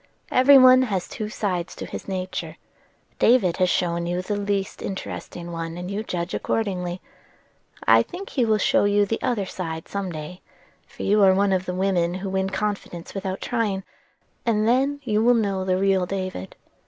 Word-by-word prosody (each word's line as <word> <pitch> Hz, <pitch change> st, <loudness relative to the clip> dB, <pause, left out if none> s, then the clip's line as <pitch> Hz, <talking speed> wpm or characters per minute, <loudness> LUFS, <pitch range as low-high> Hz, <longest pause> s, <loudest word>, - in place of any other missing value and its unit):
Every 270 Hz, +2 st, +7 dB
one 255 Hz, 0 st, +8 dB
has 200 Hz, -8 st, -1 dB
two 215 Hz, -1 st, -5 dB
sides 185 Hz, -6 st, -3 dB
to -, -, -6 dB
his -, -, -8 dB
nature: 185 Hz, -1 st, -4 dB, 0.6 s
David 220 Hz, -8 st, +4 dB
has 185 Hz, -1 st, +2 dB
shown 170 Hz, -1 st, 0 dB
you 175 Hz, +1 st, -2 dB
the 205 Hz, +3 st, -2 dB
least 200 Hz, -1 st, -2 dB
interesting 175 Hz, -2 st, -6 dB
one, 165 Hz, 0 st, -5 dB
and 180 Hz, +2 st, -5 dB
you 200 Hz, +2 st, -2 dB
judge 180 Hz, -4 st, -4 dB
accordingly. 185 Hz, -4 st, -2 dB, 0.9 s
I -, -, +7 dB
think 375 Hz, +2 st, -7 dB
he 255 Hz, -, +1 dB
will 220 Hz, -2 st, +3 dB
show 270 Hz, +4 st, +3 dB
you 205 Hz, 0 st, +3 dB
the 225 Hz, +3 st, -3 dB
other 225 Hz, -6 st, 0 dB
side 160 Hz, -4 st, -5 dB
some 200 Hz, -2 st, -4 dB
day,—for 155 Hz, +3 st, -11 dB
you 210 Hz, +1 st, +3 dB
are 190 Hz, -1 st, +6 dB
one 195 Hz, 0 st, +2 dB
of 185 Hz, 0 st, -1 dB
the 180 Hz, -, -2 dB
women 180 Hz, -2 st, +1 dB
who 190 Hz, +1 st, -4 dB
win 190 Hz, 0 st, 0 dB
confidence 195 Hz, -4 st, -4 dB
without 190 Hz, -1 st, -4 dB
trying,—and 215 Hz, 0 st, -3 dB
then 275 Hz, +4 st, +2 dB
you 215 Hz, -3 st, +1 dB
will 245 Hz, +1 st, +5 dB
know 200 Hz, -4 st, 0 dB
the 185 Hz, -1 st, +1 dB
real 190 Hz, -1 st, +2 dB
David. 185 Hz, -, -5 dB
195 Hz, 175 wpm, -24 LUFS, 180-215 Hz, 0.9 s, one